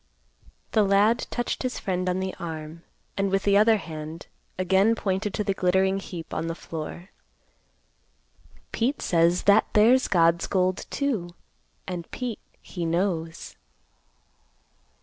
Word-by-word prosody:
The 220 - +3
lad 205 +4 +3
touched 240 - -3
his 255 -1 -2
friend 185 -1 -2
on 180 +1 0
the 190 0 -3
arm, 160 -1 -6 0.3
and 195 0 0
with 195 +1 0
the 200 -1 +3
other 215 +2 +5
hand 160 -2 -8 0.3
again 190 +4 +3
pointed 200 0 -1
to 210 - -1
the 195 - 0
glittering 190 +1 +2
heap 175 -4 -8
on 165 - -2
the 165 - -3
floor. 170 +3 -7 1.6
"Pete 255 +5 0
says 170 +1 +2
that 200 +2 +5
there's 240 +5 +5
God's 170 -1 +3
gold 185 -1 0
too, 210 -12 -2 0.5
and 175 -3 -5
Pete 245 -4 -4 0.2
he 175 - -6
knows." 165 -1 -2
190 Hz, 130 wpm, -25 LUFS, 170-205 Hz, 1.6 s, other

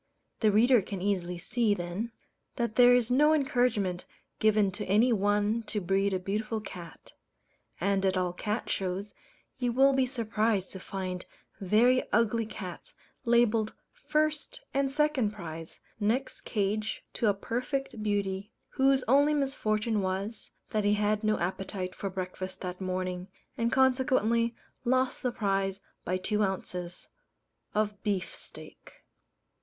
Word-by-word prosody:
The 215 -2 +4
reader 235 +3 +5
can 195 0 -5
easily 180 -2 -1
see, 215 +4 +1
then, 180 +6 -4 0.4
that 235 -2 -1
there 245 +1 +7
is 245 -1 +2
no 300 +4 +5
encouragement 245 -10 +1 0.3
given 215 -2 +3
to - - -3
any 220 +6 +4
one 205 +2 +2
to 210 - -1
breed 195 +2 +1
a 190 - +1
beautiful 215 +4 -2
cat; 175 -5 -10 0.7
and 195 +1 +1
at 190 -1 +2
all 180 -1 0
cat 210 +5 -3
shows, 195 +2 -2 0.5
you 245 -2 +1
will 270 +3 +5
be 265 -1 +2
surprised 220 -5 0
to 190 - -7
find 185 -1 -5 0.3
very 230 +7 +4
ugly 230 0 +2
cats 185 -5 -8 0.3
labelled 230 -2 +3 0.2
first 310 -11 -1
and 275 0 +2
second 275 -6 +1
prize, 165 -5 -8 0.2
next 230 +6 0
cage 210 +1 -1
to 230 - 0
a - - +4
perfect 245 +3 -3
beauty, 200 -1 -1 0.2
whose 270 -1 +3
only 285 +4 +5
misfortune 220 -6 0
was, 195 +4 -3 0.2
that 215 -1 +1
he 205 +1 +3
had 210 +1 +1
no 215 0 +2
appetite 185 +1 -3
for 195 - -4
breakfast 185 0 -5
that 180 0 -5
morning, 185 -1 -2 0.3
and 230 0 0
consequently 250 -3 +3 0.3
lost 255 +1 +1
the 250 - 0
prize 195 -3 0 0.2
by 185 - 0
two 210 +3 0
ounces 180 -2 -3 0.7
of 210 -1 0
beef 200 -4 -2
steak. - - -11
210 Hz, 140 wpm, -29 LUFS, 190-240 Hz, 0.7 s, there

